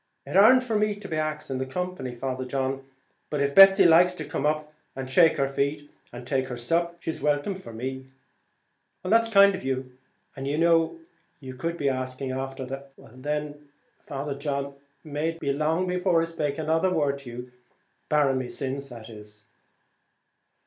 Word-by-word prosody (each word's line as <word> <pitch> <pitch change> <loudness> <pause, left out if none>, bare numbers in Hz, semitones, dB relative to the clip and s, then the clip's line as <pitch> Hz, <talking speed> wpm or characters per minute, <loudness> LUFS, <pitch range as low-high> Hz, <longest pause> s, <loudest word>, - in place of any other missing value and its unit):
"It - - -6
ar'nt 250 +6 +7
for 230 -3 -2
me 210 0 +1
to 195 -5 -6
ax 155 -1 -2
the 130 -1 -2
company, 180 -5 -4
Father 130 +1 -3
John, 135 +1 -2 0.5
but 150 - -2
if 140 0 +1
Betsy 195 +1 +8
likes 175 +2 +6
to 155 - -6
come 145 - -1
up 155 0 -2 0.2
and 135 -1 -5
shake 160 +5 +4
her 135 -1 +1
feet 140 +2 -2 0.2
and 120 0 -9
take 130 0 -1
her 125 -2 -6
sup, 170 +8 -1
she's 160 - -4
welcome 145 +6 +1
for 185 -9 -10
me." 130 +3 -6 1.0
"That's 230 +4 +3
kind 200 -2 +6
of 190 - -6
you; 130 -1 -3 0.4
and 135 0 -5
you 145 +2 -1
know 165 - +3 0.4
you 130 -2 -8
could 165 +6 -4
be 145 - -1
asking 130 0 -2
after 135 0 -4
the 135 +2 -7
" - - -36
"Well - - -16
then, 150 +2 -4 0.3
Father 140 0 -5
John, 140 -1 -3 0.3
may 150 +1 -2
it 165 0 -7
be 140 -3 -1
long 155 +5 0
before 180 -1 +1
I 165 - +1
spake 150 -4 -3
another 160 +3 +1
word 145 -5 0
to 135 -3 -11
you, 125 +1 -8 0.6
barring 140 -3 +3
my 130 - -4
sins!" 135 +1 -4
145 Hz, 175 wpm, -26 LUFS, 135-165 Hz, 1.0 s, Betsy